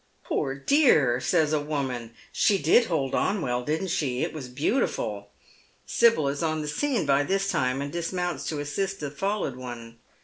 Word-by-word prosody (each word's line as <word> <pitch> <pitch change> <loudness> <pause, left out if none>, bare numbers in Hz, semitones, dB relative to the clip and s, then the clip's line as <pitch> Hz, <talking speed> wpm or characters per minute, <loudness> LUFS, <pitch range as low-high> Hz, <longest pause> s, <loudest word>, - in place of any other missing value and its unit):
" - - -40
Poor 135 0 -1
dear! 140 - +4
" - - -10
says 155 -4 +3
a 150 - +2
woman, 130 -6 -3
" - - -27
she 200 - +5
did 185 - +4
hold 145 - -1
on 200 +1 +1
well, 125 -5 -1
didn't 160 +7 -2
she? 130 -6 -1
It - - -3
was 145 -5 -6
beautiful." 125 - -1 0.6
Sibyl 230 -11 +3
is 140 +1 -2
on 155 -1 -1
the - - -5
scene 240 - 0
by 140 0 +3
this 195 +6 0
time, 130 +2 0
and 140 - -5
dismounts 175 +1 -3
to 150 - -2
assist 195 +7 -2
the 145 -2 -4
fallen 195 -5 -2
one. 115 -2 -8
150 Hz, 195 wpm, -26 LUFS, 130-185 Hz, 0.6 s, she